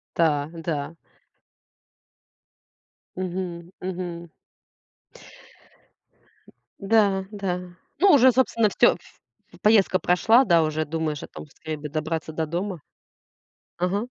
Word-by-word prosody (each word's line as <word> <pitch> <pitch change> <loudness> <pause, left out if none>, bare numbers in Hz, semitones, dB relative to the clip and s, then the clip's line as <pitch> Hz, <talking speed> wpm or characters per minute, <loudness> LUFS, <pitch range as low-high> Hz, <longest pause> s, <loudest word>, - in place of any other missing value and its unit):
Да, 150 -3 +1
да. 165 -1 -4 2.2
Мгм, 180 -1 -5
мгм. 175 -2 -5 2.5
Да, 200 -2 +2
да. 180 -3 -4 0.2
Ну, 390 +2 +6
уже, 260 -3 +7
собственно, 230 -4 +2
всё, - - +4
в - - -21 0.4
в - - -16
поездка 210 -3 +4
прошла, 220 +9 +4
да, 170 -7 +4
уже 155 0 0
думаешь 155 -1 -3
о - - -7
том: - - -10
"Скорей 155 +1 -7
бы 150 0 -6
добраться 160 +1 -3
до 160 0 -1
дома". 175 +1 -4 1.0
Ага. 195 +6 -1
175 Hz, 105 wpm, -24 LUFS, 160-195 Hz, 2.5 s, уже